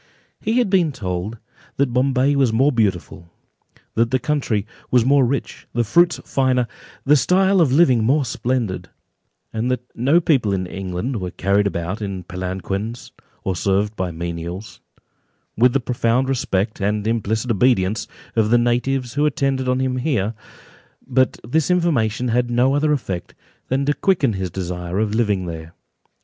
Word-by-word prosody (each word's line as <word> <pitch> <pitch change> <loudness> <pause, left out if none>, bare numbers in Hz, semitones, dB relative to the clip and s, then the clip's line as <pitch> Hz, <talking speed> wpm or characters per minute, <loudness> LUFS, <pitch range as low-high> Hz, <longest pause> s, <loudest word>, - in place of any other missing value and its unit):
He 225 +3 0
had 245 - +3
been 175 -5 +3
told, 100 -2 -4 0.4
that 135 -3 +1
Bombay 135 +2 +2
was 135 -4 +3
more 130 +6 +3
beautiful, 95 - -1 0.6
that 115 +1 +2
the 130 - +2
country 135 -8 -1 0.2
was 125 -2 +3
more 140 +1 +5
rich, 135 +3 -3
the 120 - +1
fruits 170 +10 +3
finer, 130 -2 +1 0.4
the 145 +2 +5
style 190 +5 +3
of 150 -6 +3
living 130 -6 +4
more 135 +5 +2
splendid, 120 -4 -2 0.6
and 110 +3 -1
that 125 -1 -1
no 140 +8 +3
people 130 - +2
in 95 -1 -1
England 95 +6 -4
were 90 - -3
carried 100 +3 +1
about 95 +2 -3
in 100 -3 -4
palanquins, 95 +5 -5 0.3
or 95 - -1
served 100 +4 0
by 95 -2 -2
menials, 85 +3 -6 0.7
with 125 +3 +4
the 140 - +3
profound 125 +1 0
respect, 110 -6 -1
and 105 +1 0
implicit 110 +1 0
obedience, 110 -2 +2 0.3
of 110 -2 +2
the 120 - +5
natives 120 +1 0
who 145 +2 +2
attended 135 -3 0
on 125 0 +1
him 130 -1 0
here; 125 -6 0 0.7
but 130 0 +1
this 155 +6 +1
information 125 -10 +1
had 120 +1 +1
no 125 +3 +3
other 150 +1 +2
effect 95 -11 -3 0.3
than 135 +2 0
to 145 - +2
quicken 145 - +1
his 95 -2 -3
desire 90 0 -4
of 105 0 0
living 105 -5 +1
there. 80 0 -7
120 Hz, 160 wpm, -21 LUFS, 100-135 Hz, 0.7 s, more